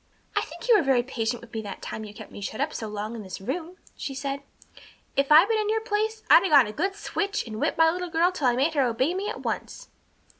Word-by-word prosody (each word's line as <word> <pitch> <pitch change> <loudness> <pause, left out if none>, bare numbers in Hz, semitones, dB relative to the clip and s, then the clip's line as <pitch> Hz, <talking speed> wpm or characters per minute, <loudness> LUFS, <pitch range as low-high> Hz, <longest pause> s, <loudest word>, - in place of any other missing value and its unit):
"I - - +3
think - - -8
you 475 - +7
were 415 - +5
very 265 -5 +3
patient 240 -2 -2
with 235 - -15
me 220 - -2
that 205 -2 -8
time 220 - -5
you 210 - -9
kept 210 - -11
me - - -9
shut 215 +3 -5
up 295 +3 -1
so 220 - -4
long 210 +2 -5
in 225 - -6
this 190 -2 -7
room," 330 - -5 0.2
she 270 - -5
said. 275 +1 -3 0.7
"If 275 +1 +1
I'd 320 +6 +8
been 445 -1 +1
in 425 -1 0
your 445 +1 +2
place 440 0 -1
I'd - - +8
have 380 - -1
got 280 -4 +8
a 210 - -6
good 390 - -1
switch 410 0 -2
and 215 -2 -6
whipped - - 0
my 325 0 +5
little 360 +1 -4
girl 335 +2 +3
till 300 -8 0
I 240 - +3
made 280 +6 +1
her 290 - +2
obey 255 +6 +1
me 395 +3 -2
at - - -6
once." - - -4
285 Hz, 270 wpm, -26 LUFS, 235-380 Hz, 0.7 s, I'd